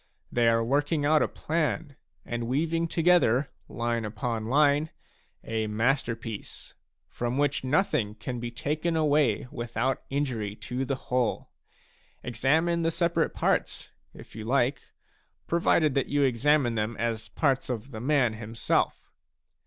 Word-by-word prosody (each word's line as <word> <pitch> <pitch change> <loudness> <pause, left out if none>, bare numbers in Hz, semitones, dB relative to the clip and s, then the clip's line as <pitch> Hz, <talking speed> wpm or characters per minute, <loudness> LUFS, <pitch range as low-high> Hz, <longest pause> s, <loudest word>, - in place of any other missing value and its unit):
They 120 -1 +2
are 115 0 +2
working 145 +4 +1
out 155 +1 +4
a - - +3
plan 155 -2 -2 0.3
and 120 -1 -3
weaving 165 +6 0
together, 160 -7 +3 0.2
line 115 -1 -1
upon 110 +1 -3
line, 145 +3 +3 0.5
a 110 -1 -2
masterpiece, 115 -1 -2 0.3
from 120 0 -3
w.hich 140 0 0
nothing 130 - +1
can 120 +3 -5
be 120 0 -4
taken 155 +7 -2
away 145 -8 +2
without 120 +2 -2
injury 125 -8 -2
to 125 +4 -4
the 135 - -1
whole. 125 -2 -2 0.7
Examine 155 +9 +1
the 165 - +2
separate 170 +1 0
parts, - - 0 0.2
if - - -14
you 110 - -6
like, 130 +2 0 0.5
provided 165 -3 +2
you 145 0 +2
examine 135 0 +3
them 110 +1 -2
as 115 -2 -2
parts 135 -4 0
of 125 +2 -4
the 110 -2 -7
man 135 -4 +2
himself. 110 +1 -1
130 Hz, 130 wpm, -27 LUFS, 115-150 Hz, 0.7 s, out